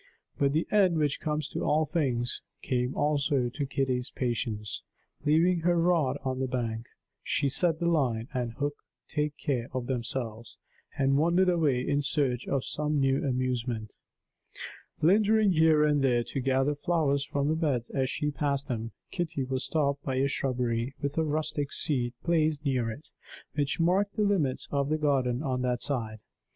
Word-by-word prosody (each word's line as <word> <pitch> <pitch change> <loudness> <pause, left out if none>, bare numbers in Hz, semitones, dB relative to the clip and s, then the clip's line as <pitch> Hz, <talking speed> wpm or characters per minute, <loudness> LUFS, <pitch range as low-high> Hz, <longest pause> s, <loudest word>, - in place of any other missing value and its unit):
But 140 -1 +2
the 160 +2 +1
end 190 -5 +4
which 150 -2 +1
comes 150 -1 -1
to - - -4
all 155 +1 +2
things 130 -7 0 0.2
came 125 0 -1
also 145 -4 +1
to 140 +4 -3
Kitty's 130 -2 -1
patience. 115 -4 -3 0.4
Leaving 165 +4 +4
her 175 +1 +2
rod 165 -6 +2
on 130 -1 -2
the 130 - 0
bank, 115 -2 -3 0.3
she 140 - 0
let 170 -3 +3
the 170 - -2
line 130 -9 +1
and 120 -3 -2
hook 145 +3 -2 0.3
take 150 -1 -2
care 125 -4 -1
of 130 -1 -2
themselves, 120 -2 -4 0.4
and 135 0 +3
wandered 175 +4 +3
away 145 -8 +1
in 145 0 +2
search 135 -4 0
of 135 -2 0
some 150 0 -1
new 135 0 +2
amusement. 125 -4 -1 1.1
Lingering 210 +4 +4
here 160 -2 +4
and 145 -1 +2
there 120 -3 +3
to 135 - -4
gather 135 +2 +2
flowers 145 -3 +1
from 140 0 -1
the 155 - +2
beds 140 -8 -1
as 130 -2 0
she 150 0 -1
passed 140 -1 -1
them, 115 -4 -4 0.2
Kitty 165 -6 -2
was 130 0 -2
stopped 140 -2 0
by 135 -2 -2
a 135 +2 +2
shrubbery, 125 -2 -1
with 140 +1 -3
a - - +3
rustic 150 -2 -1
seat 125 -4 0
placed 155 -3 +1
near 125 -4 +1
it, 135 +8 -9 0.4
which 145 +1 -1
marked 190 +4 +2
the 215 - +1
limits 180 -11 +1
of 140 0 0
the 155 - +1
garden 135 -3 +1
on 130 -3 -1
that 125 -1 -1
side. 115 -6 -2
140 Hz, 170 wpm, -29 LUFS, 125-155 Hz, 1.1 s, end